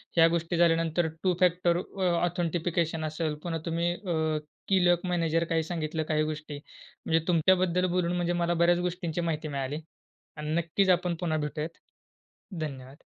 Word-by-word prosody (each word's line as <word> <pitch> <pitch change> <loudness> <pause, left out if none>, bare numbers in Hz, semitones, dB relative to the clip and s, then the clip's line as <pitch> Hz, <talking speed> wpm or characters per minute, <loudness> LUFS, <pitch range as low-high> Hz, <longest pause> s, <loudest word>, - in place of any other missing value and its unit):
ह्या 165 -1 +7
गोष्टी 165 +1 -1
झाल्यानंतर 165 0 +3 0.2
टू 185 -1 +3
फॅक्टर 175 -1 +3
अ, 190 +2 -6 0.2
ऑथेंटिकेशन 170 -2 -1
असेल, 155 0 -2
पुन्हा 165 -2 -2
तुम्ही 170 +1 0
अ, 160 -5 -1 0.3
की 190 -2 +3
लॉक 175 +1 +3
मॅनेजर 165 -2 +1
काही 165 -1 +1
सांगितलं 160 -1 -2
काही 155 0 +2
गोष्टी. 155 -1 -5 0.5
म्हणजे 165 0 +2
तुमच्याबद्दल 180 +1 +3
बोलून 175 -1 +1
म्हणजे 175 0 0
मला 175 0 +1
बऱ्याचं 175 +1 +3
गोष्टींची 175 -1 -2
माहिती 160 -2 -2
मिळाली. 140 +2 -3 0.6
आणि 150 0 -5
नक्कीचं 170 +3 +2
आपण 180 -1 0
पुन्हा 160 -3 0
भेटूयात. 150 +1 -3 0.9
धन्यवाद. 135 -2 -7
165 Hz, 150 wpm, -28 LUFS, 155-175 Hz, 0.9 s, ह्या